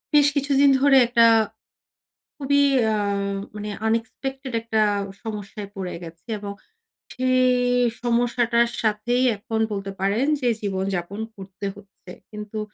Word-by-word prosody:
বেশ 290 -1 +6
কিছুদিন 280 0 +3
ধরে 275 0 +5
একটা 235 -1 +5 1.1
খুবই 285 0 +2 0.3
আ - - +1 0.6
মানে 210 0 -5 0.2
আনএক্সপেক্টেড 260 +4 -3
একটা 225 -1 -1 0.4
সমস্যায় 210 -2 -6
পড়ে 185 -2 -4
গেছি 165 +5 -12
এবং 200 0 -6 0.6
সেই 255 0 +2 0.5
সমস্যাটার 235 0 +2
সাথেই 225 +3 +1
এখন 220 +2 -4
বলতে 195 -1 -4
পারেন 205 +7 +1
যে 250 - +1
জীবন-যাপন 195 0 -3 0.2
করতে 195 0 -8
হচ্ছে। 200 -2 -15 0.2
কিন্তু 210 0 -7
225 Hz, 115 wpm, -23 LUFS, 200-255 Hz, 1.1 s, বেশ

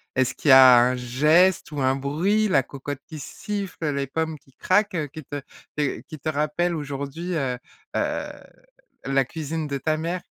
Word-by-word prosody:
est-ce 130 0 +1
qu'il 150 - -2
y - - +9
a 130 -2 +9
un 125 +1 +3
geste 150 +10 +3
ou 145 -2 -3
un 130 0 +2
bruit, 170 +11 +1
la 150 -9 +3
cocotte 140 +1 -7
qui 155 - -8
siffle, 190 -1 -4
les 140 0 -2
pommes 160 +3 -2
qui 135 - -26
craquent, 185 -6 +1
qui 155 -1 -8
te 145 +2 -6 0.4
te 145 -3 -1
qui 155 - -10
te 155 - -3
rappellent 155 +4 0
aujourd'hui, 145 +4 -5
heu 130 -5 -1 0.4
heu, - - -1 0.7
la 135 0 +2
cuisine 160 +2 -4
de 140 -1 -2
ta 155 +4 -1
mère? 170 +3 -3
150 Hz, 180 wpm, -24 LUFS, 135-165 Hz, 0.7 s, y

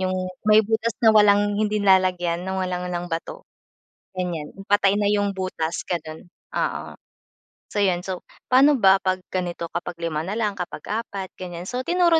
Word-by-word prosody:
'Yung 185 0 0 0.3
may 215 +1 +6
butas 220 +1 -1
na 220 - +8
walang 205 -1 +4
hindi 215 0 +1
nilalagyan 185 -4 +3
ng 190 +1 -4
walang 180 -1 -2
lang 175 -1 -3
bato. 175 - -5 0.7
Ganyan 175 -5 -3 0.2
patay 200 -1 +3
na 210 - +1
'yung 205 -1 0
butas, 170 -3 -3
ganun. 160 -2 -5 0.3
Oo. - - -2 0.8
So, 210 - -1
'yun 180 -3 +2
so, 190 -2 -4 0.3
pano 275 +3 +6
ba 195 -5 +5
'pag 185 -1 -1
ganito 175 -2 -3
kapag 175 0 -4
lima 165 -1 -3
na 200 - -3
lang, 210 -4 -1
kapag 180 - -5 0.2
apat 195 -4 -7
ganyan. 175 -2 -6
So, 250 +7 -4
tinuro 345 -2 +4
190 Hz, 165 wpm, -23 LUFS, 175-210 Hz, 0.8 s, na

